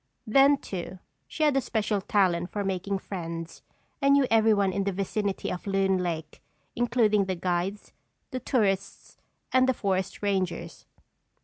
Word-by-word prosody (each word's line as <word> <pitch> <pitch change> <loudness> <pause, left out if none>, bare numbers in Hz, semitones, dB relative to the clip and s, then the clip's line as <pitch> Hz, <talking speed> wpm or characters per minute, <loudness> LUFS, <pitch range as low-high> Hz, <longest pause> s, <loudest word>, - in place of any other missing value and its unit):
Then 275 +5 +5
too, 185 -5 -6 0.3
she 310 - -3
had 295 -2 +3
a 270 - +3
special 215 -4 -1
talent 180 -4 +1
for 205 - -3
making 195 +1 -2
friends 165 -4 -6 0.4
and 275 0 +5
knew 280 -1 +5
everyone 215 -4 +4
in 195 +1 0
the 200 - 0
vicinity 200 +1 -2
of 180 +2 -6
Loon 195 -1 +2
Lake, 160 -4 -4 0.3
including 230 -4 +2
the 190 -1 -2
guides, 180 +3 -2 0.4
the 255 - -3
tourists 200 -6 -1 0.3
and 255 0 +4
the 260 - +2
forest 190 -1 -2
rangers. 190 -3 -2
195 Hz, 145 wpm, -27 LUFS, 185-220 Hz, 0.4 s, Then